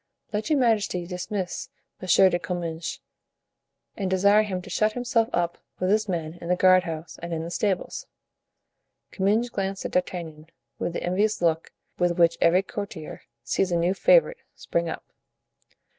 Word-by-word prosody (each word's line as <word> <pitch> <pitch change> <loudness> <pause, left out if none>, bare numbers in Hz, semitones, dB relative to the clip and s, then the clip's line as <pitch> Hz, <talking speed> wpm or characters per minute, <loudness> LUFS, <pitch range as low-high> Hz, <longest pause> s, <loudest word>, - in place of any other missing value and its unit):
"Let 210 +7 -2
your 305 - +3
majesty 215 -8 +1
dismiss 180 +1 -4 0.3
M. 185 - -6 0.2
de 175 - 0
Comminges 165 -1 -4 1.0
and 195 -4 -2
desire 200 +3 +5
him 195 -4 -2
to - - -11
shut 215 0 +2
himself 245 -2 +1
up 175 0 -1 0.2
with 185 +1 0
his 215 0 +2
men 165 -1 -3
in 170 - -7
the 180 - +3
guardhouse 180 -3 +2
and 170 0 -6
in 160 -1 -2
the 170 - -6
stables." 190 0 -2 1.0
Comminges 215 +5 +1
glanced 195 -1 -3
at - - -3
D'Artagnan 165 -4 -3 0.3
with 170 - -2
the - - -4
envious 205 +5 +1
look 165 -1 0 0.3
with 175 -1 +1
which 170 -1 +4
every 180 +3 +4
courtier 195 -6 -7 0.2
sees 185 +9 0
a 170 - +2
new 175 +2 +2
favorite - - +4
spring 170 0 -2
up. - - -6
180 Hz, 160 wpm, -25 LUFS, 170-205 Hz, 1.0 s, desire